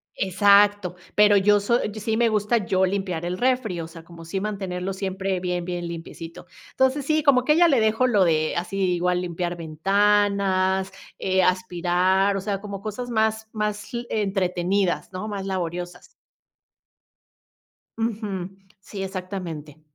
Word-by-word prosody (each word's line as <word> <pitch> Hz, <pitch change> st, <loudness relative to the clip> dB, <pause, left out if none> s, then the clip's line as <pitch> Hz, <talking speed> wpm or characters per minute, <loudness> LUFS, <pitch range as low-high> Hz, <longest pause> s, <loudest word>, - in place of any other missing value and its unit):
Exacto. 200 Hz, 0 st, +3 dB, 0.2 s
Pero 210 Hz, -1 st, +6 dB
yo 205 Hz, +1 st, +4 dB
so 235 Hz, +4 st, +1 dB
Sí 220 Hz, +1 st, -2 dB
me 235 Hz, 0 st, +3 dB
gusta, 215 Hz, +2 st, +1 dB
yo 190 Hz, 0 st, +2 dB
limpiar 185 Hz, -3 st, -2 dB
el 180 Hz, +1 st, -3 dB
refri, 245 Hz, -8 st, 0 dB
o 160 Hz, -, -6 dB
sea, 165 Hz, 0 st, -12 dB
como 170 Hz, 0 st, -13 dB
sí 180 Hz, +4 st, -3 dB
mantenerlo 195 Hz, -2 st, -3 dB
siempre 190 Hz, -1 st, -2 dB
bien, 180 Hz, -1 st, -2 dB
bien 175 Hz, -1 st, -4 dB
limpiecito. 165 Hz, 0 st, -8 dB, 0.3 s
Entonces, 265 Hz, +1 st, +1 dB
sí, 310 Hz, +1 st, +1 dB
como 265 Hz, -4 st, +4 dB
que 300 Hz, -, +5 dB
a -, -, +1 dB
ella 345 Hz, +1 st, +6 dB
le 275 Hz, -6 st, +3 dB
dejo 220 Hz, +3 st, +2 dB
lo 210 Hz, -6 st, +3 dB
de 155 Hz, -2 st, +1 dB
así, 180 Hz, +3 st, -3 dB, 0.2 s
igual 180 Hz, +1 st, 0 dB
limpiar 175 Hz, 0 st, -3 dB
ventanas, 195 Hz, +2 st, +1 dB, 0.3 s
eh, 190 Hz, 0 st, +1 dB
aspirar, 185 Hz, +2 st, +1 dB
o -, -, -3 dB
sea, 200 Hz, 0 st, -3 dB
como 200 Hz, -2 st, -7 dB
cosas 220 Hz, +4 st, -5 dB
más 220 Hz, -1 st, 0 dB
más 210 Hz, +2 st, -3 dB
l 240 Hz, 0 st, -3 dB
entretenidas, 190 Hz, -2 st, 0 dB
¿no?, 185 Hz, +3 st, -5 dB
más 200 Hz, -2 st, -4 dB
laboriosas. 180 Hz, -1 st, -4 dB, 1.9 s
Ujú, 210 Hz, -5 st, -3 dB, 0.3 s
sí, 195 Hz, 0 st, -7 dB
exactamente. 180 Hz, -6 st, -6 dB
195 Hz, 150 wpm, -24 LUFS, 180-210 Hz, 1.9 s, Pero